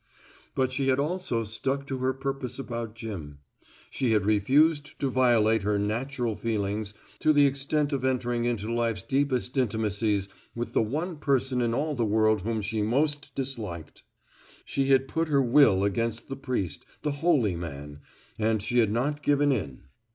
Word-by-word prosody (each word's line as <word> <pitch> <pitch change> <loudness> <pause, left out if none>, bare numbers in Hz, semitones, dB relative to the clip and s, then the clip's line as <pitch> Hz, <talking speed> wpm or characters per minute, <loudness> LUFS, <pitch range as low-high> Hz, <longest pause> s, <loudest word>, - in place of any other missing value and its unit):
But 130 -1 +1
she 135 +1 -1
had 130 -1 +3
also 150 -5 -1
stuck 135 +6 -2
to 135 -2 -4
her 130 +1 +1
purpose 135 -1 -3
about 115 -4 -5
Jim. 95 -11 -7 0.5
She 125 -4 +1
had 105 -3 +2
refused 145 +9 +2
to 135 -2 0
violate 115 -4 +3
her 105 +1 +1
natural 115 +3 -2
feelings 105 -1 -2 0.2
to 155 - +4
the 145 -1 +5
extent 140 +2 0
of 135 -2 -1
entering 120 -2 0
into 115 -2 -1
life's 115 -4 -1
deepest 135 -2 0
intimacies 105 -3 0 0.3
with 120 0 -4
the - - +3
one 155 +10 -2
person 135 -3 +1
in 115 -1 +1
all 150 +3 -1
the 120 -4 0
world 110 -1 +2
whom 110 +1 -2
she 110 +2 -2
most 145 +5 0
disliked. 110 -12 -5 0.6
She 135 -1 -1
had 135 -1 +4
put 165 +3 -1
her 145 -2 +3
will 120 -6 +5
against 115 +3 -1
the 135 - -3
priest, 125 - -3 0.2
the 150 - 0
holy 135 - +3
man, 75 -3 -7 0.4
and 110 0 +2
she 120 +3 +1
had 110 -3 +3
not 145 +6 -1
given 145 0 +3
in. 85 - -3
120 Hz, 165 wpm, -27 LUFS, 110-140 Hz, 0.6 s, the